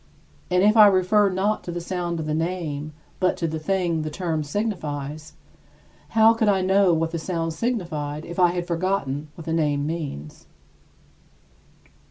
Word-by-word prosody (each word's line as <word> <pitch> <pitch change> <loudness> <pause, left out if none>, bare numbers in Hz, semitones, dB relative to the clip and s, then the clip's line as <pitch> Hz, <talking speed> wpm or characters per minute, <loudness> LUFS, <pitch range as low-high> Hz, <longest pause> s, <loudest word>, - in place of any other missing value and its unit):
And 180 +1 +3
if 210 +2 +5
I 215 -2 +9
refer 200 +2 +3
not 195 +3 0
to 175 - -5
the 175 - -4
sound 175 -1 -3
of 160 - -3
the 155 - -2
name, 160 -3 -3 0.3
but 185 -1 +1
to 165 - -1
the 160 0 -3
thing 175 0 0
which 155 - -2
the - - -2
term 160 -1 -2
signifies, 150 -5 -4 0.8
how 220 +1 +7
could 225 -2 +1
I 195 -2 +3
know 190 0 +4
what 165 0 0
that 170 - -3
sound 165 -1 -2
signified 160 -8 -3
if 170 +2 -7
I 180 - +6
had 175 -1 -2
forgotten 165 -5 -2
what 165 - -10
the 165 - -2
name 145 -3 +1
means? 145 - -6
170 Hz, 175 wpm, -24 LUFS, 155-190 Hz, 0.8 s, I